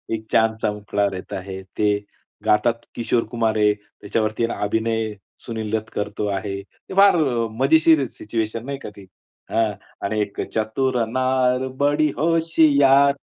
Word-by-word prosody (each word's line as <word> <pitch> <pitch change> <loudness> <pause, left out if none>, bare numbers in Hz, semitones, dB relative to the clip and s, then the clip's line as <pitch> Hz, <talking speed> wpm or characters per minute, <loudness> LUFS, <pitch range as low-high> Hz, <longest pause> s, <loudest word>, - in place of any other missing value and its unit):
एक 110 0 -8
चांदसा 110 -1 +2
मुखडा 105 0 -1
रहाता 95 0 -4
है. 95 0 -7
ते 105 +2 0 0.5
गातात 115 +2 +2
किशोर 115 0 +1
कुमार 115 -2 +1
आहे. 105 -1 +4
त्याच्यावरती 110 +2 -2
अभिनय 110 +1 0 0.3
सुनील 110 -2 -4
दत्त 110 0 -8
करतो 105 0 -3
आहे. 100 0 -4
ते 100 - -14
फार 200 -1 +7
अ, 125 -8 +1
मजेशीर 155 0 +5
सिच्युएशन 110 +1 -3
नाही 140 0 -4
का - - -7
ती. 100 -1 -12 0.5
हां, 115 -1 +2 0.3
आणि 105 +1 -1
एक 100 -1 -3
चतुर 120 +3 0
नार 130 0 +1 0.2
बडी 145 +1 +3
होशियार. 145 -4 +4
115 Hz, 140 wpm, -22 LUFS, 105-135 Hz, 0.5 s, फार